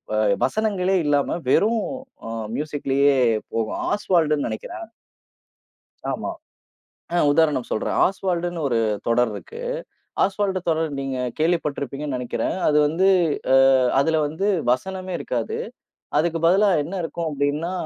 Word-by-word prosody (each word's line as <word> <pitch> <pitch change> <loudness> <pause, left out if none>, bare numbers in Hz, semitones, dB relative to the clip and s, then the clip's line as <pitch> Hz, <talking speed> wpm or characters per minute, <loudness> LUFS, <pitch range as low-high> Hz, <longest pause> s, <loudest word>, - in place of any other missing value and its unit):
அ - - +1 0.2
இப்ப - - -5
வசனங்களே 195 -3 0
இல்லாம, 145 -1 +2 0.2
வெறும் 220 +7 +3 0.4
அ - - -5 0.3
மியூசிக்லயே 140 -2 +1 0.4
போகும். 115 -1 -1
ஆஸ்வால்டுன்னு 165 -7 +1
நெனைக்கிறேன். 110 - -6 1.3
ஆமா. - - -3 0.8
அ, - - +2 0.2
உதாரணம் 150 -5 +2
சொல்றேன். 110 - -1
ஆஸ்வால்டுன்னு 175 -3 -2
ஒரு 120 -3 +1 0.3
தொடர் 120 0 +3
இருக்கு. 460 - -9 0.6
ஆஸ்வால்டு 195 -1 0
தொடர் 160 0 +1
நீங்கக் 130 -3 -3
கேள்விப்பட்டிருப்பீங்கன்னு 150 -4 -1
நெனைக்கிறேன். 125 -1 -2
அது 150 0 +3
வந்து 170 +6 +2 0.5
அ - - +7 0.4
அதுல 160 +3 +2
வந்து 160 +7 -2 0.2
வசனமே 185 +8 -2
இருக்காது. 120 -3 -3 0.6
அதுக்கு 165 +1 0
பதிலா 200 +4 +4
என்ன 165 +6 -7
இருக்கும் 165 0 -3
அப்டின்னா, 145 +4 -1
160 Hz, 120 wpm, -23 LUFS, 140-185 Hz, 1.3 s, அ